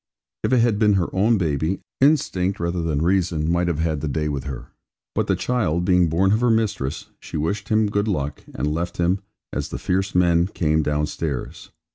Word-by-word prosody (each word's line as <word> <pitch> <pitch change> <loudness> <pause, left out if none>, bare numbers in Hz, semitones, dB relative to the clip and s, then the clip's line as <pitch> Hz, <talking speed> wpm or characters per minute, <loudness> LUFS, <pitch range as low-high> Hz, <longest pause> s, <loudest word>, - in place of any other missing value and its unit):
If - - 0
it 125 -2 +4
had 115 -3 +2
been 105 -2 +4
her 95 -3 0
own 110 +4 +3
baby, 80 +1 0 0.2
instinct 130 -10 +2
rather 85 +1 -1
than 80 -2 0
reason 85 -3 +1
might 85 0 +1
have 85 -4 0
had 80 -2 -1
the 75 - -2
day 75 +2 -1
with 70 -2 -3
her; 65 -3 -7 0.4
but - - 0
the - - +2
child 90 -9 0
being 90 -2 +4
born 95 +5 +2
of 110 +3 +2
her 125 - +3
mistress, 100 -10 -1
she - - -6
wished 85 +7 -2
him 110 0 +3
good 100 +1 0
luck, 75 -8 -2
and 75 +4 -1
left 85 +2 -3
him, 90 +3 +1 0.3
as - - -3
the - - -4
fierce 95 +1 -1
men 85 -1 +4
came 80 -5 +1
downstairs. 75 -2 -3
85 Hz, 200 wpm, -22 LUFS, 75-100 Hz, 0.4 s, it